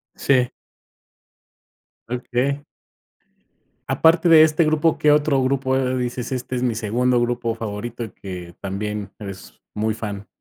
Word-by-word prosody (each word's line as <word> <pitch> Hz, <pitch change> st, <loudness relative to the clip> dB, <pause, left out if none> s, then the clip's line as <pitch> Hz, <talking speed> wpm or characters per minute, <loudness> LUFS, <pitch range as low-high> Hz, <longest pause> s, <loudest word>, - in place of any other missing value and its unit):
Sí. 130 Hz, -2 st, +2 dB, 1.6 s
Okey. 125 Hz, +3 st, -1 dB, 1.2 s
Aparte 165 Hz, +1 st, +4 dB
de 160 Hz, -1 st, +9 dB
este 155 Hz, +1 st, +4 dB
grupo, 155 Hz, +1 st, +2 dB
¿qué 150 Hz, -, +4 dB
otro 145 Hz, -2 st, +3 dB
grupo, 130 Hz, 0 st, +1 dB
eh, 130 Hz, -1 st, 0 dB
dices: 125 Hz, -1 st, -3 dB
"Este 130 Hz, 0 st, -3 dB
es 125 Hz, -, -1 dB
mi 120 Hz, -2 st, +1 dB
segundo 120 Hz, +3 st, +1 dB
grupo 120 Hz, -1 st, -1 dB
favorito", 115 Hz, +2 st, -5 dB
y 110 Hz, -, -6 dB
que 90 Hz, -4 st, -9 dB
también 100 Hz, +1 st, -4 dB
eres 100 Hz, -3 st, -9 dB
muy 110 Hz, +1 st, 0 dB
fan? 105 Hz, -2 st, -6 dB
125 Hz, 135 wpm, -22 LUFS, 105-140 Hz, 1.6 s, de